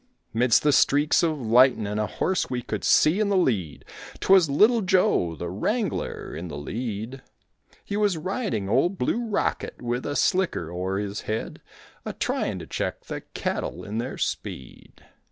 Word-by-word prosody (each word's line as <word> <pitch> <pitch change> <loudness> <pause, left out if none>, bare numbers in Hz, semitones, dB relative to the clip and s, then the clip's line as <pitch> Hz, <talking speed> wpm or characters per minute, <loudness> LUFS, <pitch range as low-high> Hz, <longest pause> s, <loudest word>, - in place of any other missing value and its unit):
'Midst 115 0 +3
the 150 - +4
streaks 145 +3 +4
of 160 -3 0
lightin' 120 0 +4
a 105 +1 -1
horse 190 -1 -1
we 125 -1 -3
could 105 -2 -4
see 160 +6 +4
in 215 -2 +1
the 200 - +2
lead, 100 - 0 0.3
'Twas 190 -5 +5
Little 220 - +4
Joe, 180 - +2
the 85 +1 -5
wrangler, 205 - -2
in 85 +3 -6
the 75 - -7
lead; 115 - -5 0.6
He 200 - -4
was 205 -4 +1
riding 160 - -2
Old 140 - +2
Blue 230 - 0
Rocket 205 - -2
with 120 +1 -3
a 145 - -3
slicker 145 - +1
o'er 95 +2 -2
his 100 0 -3
head, 110 +1 -3 0.4
A - - -5
tryin' - - -2
to - - -7
check - - -4
the - - -5
cattle - - -3
in 105 +2 -4
their 120 +3 -4
speed. 65 - -6
125 Hz, 165 wpm, -25 LUFS, -, 0.6 s, Twas